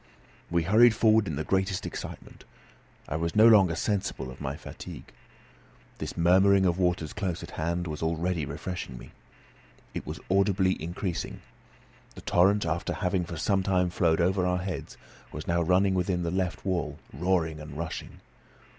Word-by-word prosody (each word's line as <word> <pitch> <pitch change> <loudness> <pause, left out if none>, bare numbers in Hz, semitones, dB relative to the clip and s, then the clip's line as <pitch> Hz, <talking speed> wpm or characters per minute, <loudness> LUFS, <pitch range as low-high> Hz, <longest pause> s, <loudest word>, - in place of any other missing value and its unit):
We 85 -1 +1
hurried 110 +6 +6
forward 110 -1 +4
in 75 - -2
the 80 - -2
greatest 95 +2 0
excitement. - - -8 0.6
I 80 - -2
was 85 +1 -2
no 110 +2 +7
longer 95 -7 +6
sensible 95 -10 -2
of 65 - -12
my 70 -1 -3
fatigue. - - -10 0.9
This - - -5
murmuring 95 +3 +5
of 90 0 +1
waters 90 -1 0
close 95 -6 -3
at - - -9
hand 85 +2 -2
was 75 -3 -5
already 85 +1 -1
refreshing 70 -1 -5
me. - - -12 0.8
It - - -6
was - - -5
audibly 95 -1 +3
increasing. 85 +2 -4 0.7
The - - -10
torrent, 100 +2 +3
after 80 0 -1
having 90 -1 -1
for 85 -1 -7
some 95 +5 +1
time 90 -2 +1
flowed 85 -2 +2
over 95 +2 +2
our 90 0 +1
heads, 95 -1 -5 0.3
was 75 - -7
now 85 0 +1
running 95 +3 +3
within 90 -1 0
the 85 - -1
left 95 +1 -2
wall, 90 -5 -1 0.2
roaring 80 0 0
and 75 -1 -9
rushing. 80 0 -6
90 Hz, 165 wpm, -28 LUFS, 80-95 Hz, 0.9 s, no